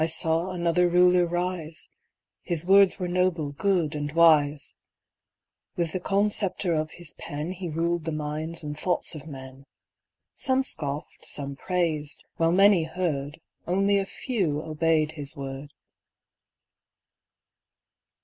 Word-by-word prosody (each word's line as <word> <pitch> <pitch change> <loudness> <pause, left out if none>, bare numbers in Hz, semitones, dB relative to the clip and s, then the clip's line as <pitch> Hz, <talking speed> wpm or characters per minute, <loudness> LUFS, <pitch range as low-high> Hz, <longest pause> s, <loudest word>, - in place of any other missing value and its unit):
I - - +2
saw 165 +2 +1
another 175 0 +1
Ruler 180 0 +4
rise 175 -2 -3 0.5
His 170 -2 0
words 195 0 +6
were 180 - -3
noble, 175 -4 0
good, 170 0 0
and 145 -1 -3
wise; 155 -3 +4 1.0
With 170 -2 -1
the 185 - -1
calm 200 +3 +1
sceptre 190 -3 +1
of 155 -1 -1
his 175 - -5
pen 150 +4 -5
He 185 -1 -5
ruled 165 +1 -1
the 165 - -2
minds 155 +2 -4
and 150 0 -5
thoughts 180 +4 0
of 155 0 -9
men; 130 -2 -10 0.7
Some 265 0 +1
scoffed, 145 - -4
some 140 -1 -4
praised 155 -2 -2
while 165 0 +2
many 195 -2 +5
heard, 160 -3 -3 0.3
Only 195 +3 +2
a 195 - -3
few 180 - -2
obeyed 155 0 +1
his 150 -1 -3
word. 135 +1 -7
165 Hz, 130 wpm, -26 LUFS, 150-180 Hz, 1.0 s, words